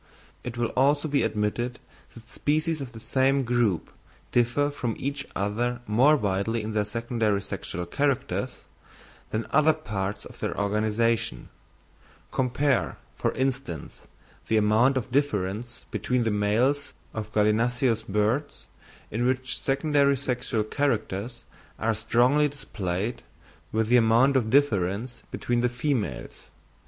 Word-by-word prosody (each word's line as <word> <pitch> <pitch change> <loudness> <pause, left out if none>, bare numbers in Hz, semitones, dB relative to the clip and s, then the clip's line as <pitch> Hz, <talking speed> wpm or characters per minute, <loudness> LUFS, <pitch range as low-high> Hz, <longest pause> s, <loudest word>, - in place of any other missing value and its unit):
It 120 -1 -6
will 120 -1 0
also 145 +4 +2
be 145 -1 +2
admitted 115 +4 -1 0.4
that 115 -1 -13
species 155 +3 0
of 130 -3 -6
the 115 - -9
same 135 +3 +2
group 120 -7 +1 0.4
differ 125 +4 +2
from 120 -5 -3
each 140 0 -3
other 120 +5 -1
more 130 +8 +5
widely 105 +1 -1
in 110 - -4
their 105 -1 +1
secondary 110 -2 -1
sexual 90 0 -5
characters, 140 +8 -1 0.7
than 110 +1 -1
in - - -15
other 155 +2 +5
parts 105 -10 -4
of - - -12
their - - -3
organisation; 110 - 0 0.8
compare, 130 +1 +1 0.2
for - - 0
instance, 130 - -3 0.4
the 110 - +2
amount 110 +6 +4
of 125 -2 -3
difference 115 -3 -1
between 125 -1 0
the 115 - +1
males 115 +8 +1 0.2
of 110 -1 -5
gallinaceous 115 +3 +2
birds, 110 +7 -1 0.5
in 115 +3 -1
which 130 0 +1
secondary 140 0 +2
sexual 125 -4 -1
characters 115 -3 -2 0.3
are 115 0 +1
strongly 120 +7 +3
displayed, 105 -6 -4 0.5
with 110 0 0
the 125 - +6
amount 120 +4 +4
of 120 -4 +2
difference 115 -3 +1
between 120 0 -1
the 125 - +2
females. 120 -2 -3
120 Hz, 130 wpm, -26 LUFS, 105-135 Hz, 0.8 s, the